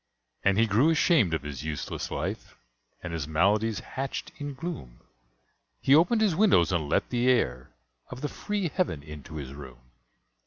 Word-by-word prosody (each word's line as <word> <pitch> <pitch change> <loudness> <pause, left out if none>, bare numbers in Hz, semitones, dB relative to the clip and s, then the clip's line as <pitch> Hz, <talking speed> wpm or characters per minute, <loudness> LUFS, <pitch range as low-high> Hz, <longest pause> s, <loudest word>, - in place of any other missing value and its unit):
And 100 0 +3
he 115 - +5
grew 115 +8 +3
ashamed 160 - +3
of 80 - -4
his 75 -2 -6
useless 80 -1 -4
life, - - -4 0.5
And 85 -2 -5
his 80 -3 -3
maladies 100 +7 +2
hatched 135 +1 -5
in 145 -2 -5
gloom; 135 - -7 0.8
He 135 - +3
opened 175 +9 +5
his 205 -7 +3
windows 180 - +4
and 80 -5 -1
let - - +1
the 125 +1 +2
air 65 - +1 0.4
Of 125 +1 -8
the 150 - -1
free 205 +2 -3
heaven 145 - -1
into 75 +1 -10
his 70 -3 -6
room. 65 -3 -12
105 Hz, 165 wpm, -27 LUFS, -, 0.8 s, he